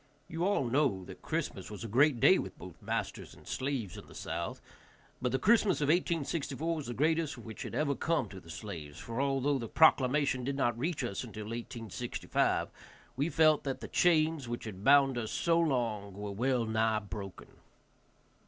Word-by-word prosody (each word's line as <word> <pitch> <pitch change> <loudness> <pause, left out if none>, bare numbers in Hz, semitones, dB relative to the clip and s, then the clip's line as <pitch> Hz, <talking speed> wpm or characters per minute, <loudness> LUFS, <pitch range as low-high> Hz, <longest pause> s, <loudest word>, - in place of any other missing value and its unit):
You 165 +1 -3
all 200 -8 +2
know 120 -7 +1
that - - -11
Christmas - - -3
was 105 +2 -7
a - - -4
great 130 +4 +4
day - - +6
with - - -6
both - - -11
masters - - -4
and - - -17
slaves 130 -9 -3
in - - -14
the - - -14
South, - - -4 0.6
but 125 -1 0
the 130 - +2
Christmas 210 - +3
of 145 -1 +1
1864 165 -2 0
was 150 -5 -5
the 120 - -4
greatest 155 0 +1
which 110 -2 -9
had - - -5
ever 145 -2 +1
come 155 -3 0
to 95 0 -9
the 85 - -16
slaves, 80 -6 -7
for, 115 +3 -3
although 140 0 +1
the 115 - -4
proclamation 135 -2 +4
did 140 +2 -2
not 120 -4 +1
reach 145 +4 -2
us 110 -3 -3
until 110 -3 -7
1865, 115 +1 -2 0.5
we 145 +5 0
felt 155 0 +4
that 135 -2 -3
the - - -7
chains 160 -6 +2
which 120 - -4
had 100 -3 -8
bound 135 -2 +5
us 110 -2 -3
so 170 -1 +2
long 115 - 0
were 100 0 -5
well 120 +3 +1
nigh 110 0 +1
broken. 100 -3 -7
130 Hz, 185 wpm, -32 LUFS, 110-150 Hz, 0.6 s, day